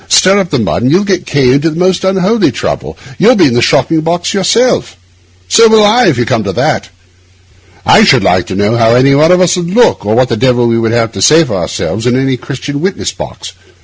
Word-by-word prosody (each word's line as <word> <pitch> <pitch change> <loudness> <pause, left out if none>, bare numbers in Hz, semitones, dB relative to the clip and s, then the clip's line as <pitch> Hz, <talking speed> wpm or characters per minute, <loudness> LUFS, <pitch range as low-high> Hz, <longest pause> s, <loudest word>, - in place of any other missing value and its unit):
Stir 195 +2 +3
up 190 -3 -3
the 145 - -1
mud, 110 - -2
and 125 +3 0
you'll 180 +5 +2
get 185 -3 -3
K— 135 -3 +1
into 145 +4 0
the 160 - -7
most 185 +1 0
unholy 190 - 0
trouble; - - -5 0.2
you'll 235 +8 +4
be 190 - +3
in 120 - 0
a 120 - +1
shocking 155 +4 +1
box 170 +2 -2
yourself. 205 - 0 0.5
So 225 - +4
will 220 -1 +4
I, 220 +1 +3
if 155 -8 +1
you 120 - -1
come 110 -1 -1
to 100 - -3
that. - - -2 1.0
I - - +4
should - - +3
like - - 0
to - - -6
know 100 +4 0
how 115 0 +2
any 135 +3 +3
one 155 +4 +3
of 180 0 +3
us 180 0 +1
would 175 -1 -4
look, 240 +6 +1
or 105 +2 -1
what 125 +1 +1
the 115 - -2
devil 125 0 +1
we 115 -1 0
should 115 -1 -1
have 115 -1 -1
to 95 - -7
say 155 +9 +4
for 120 - -6
ourselves, 95 +6 -4
in 125 - +1
any 135 0 -1
Christian 140 +3 -7
witness 190 +2 -3
box. - - -9
145 Hz, 245 wpm, -10 LUFS, 120-185 Hz, 1.0 s, you'll